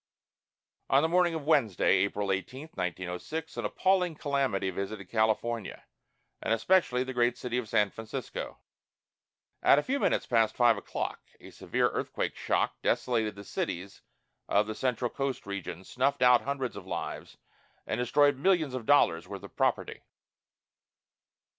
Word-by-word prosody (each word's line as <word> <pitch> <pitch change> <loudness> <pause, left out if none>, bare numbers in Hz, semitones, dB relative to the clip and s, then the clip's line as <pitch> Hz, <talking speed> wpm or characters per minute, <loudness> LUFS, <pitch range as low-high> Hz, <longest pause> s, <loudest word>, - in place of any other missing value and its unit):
On 135 +2 +4
the - - +3
morning 175 0 +2
of 155 -3 -5
Wednesday, 115 - +3
April 100 +1 0
18, 130 - -4
1906, 90 - -4
an 120 -2 -3
appalling 180 - +1
calamity 135 -11 0
visited 100 +2 -5
California, 110 0 0 0.6
and - - -2
especially 125 -1 +2
the 130 0 -6
great 120 0 +2
city 125 0 -2
of 115 -4 -6
San 105 -2 +2
Francisco. 115 +3 -6 1.0
At - - +6
a 145 - +2
few 280 +2 -1
minutes - - +1
past 115 -3 +2
five 120 -2 +5
o'clock 100 - -4 0.2
a - - -13
severe - - 0
earthquake - - -3
shock - - -1
desolated 115 -4 0
the 100 - -9
cities 95 0 -4 0.5
of 105 +1 +3
the 110 - -4
central 125 0 -1
coast 135 -2 -3
region, 100 -3 -5
snuffed 130 +7 0
out 125 -1 +6
hundreds 135 -2 -3
of - - -9
lives, - - -5 0.5
and 110 - -2
destroyed 145 +3 +3
millions 160 -4 +2
of 125 -4 -5
dollars' 85 -13 +4
worth - - -8
of - - -11
property. - - 0
120 Hz, 145 wpm, -29 LUFS, 105-140 Hz, 1.0 s, At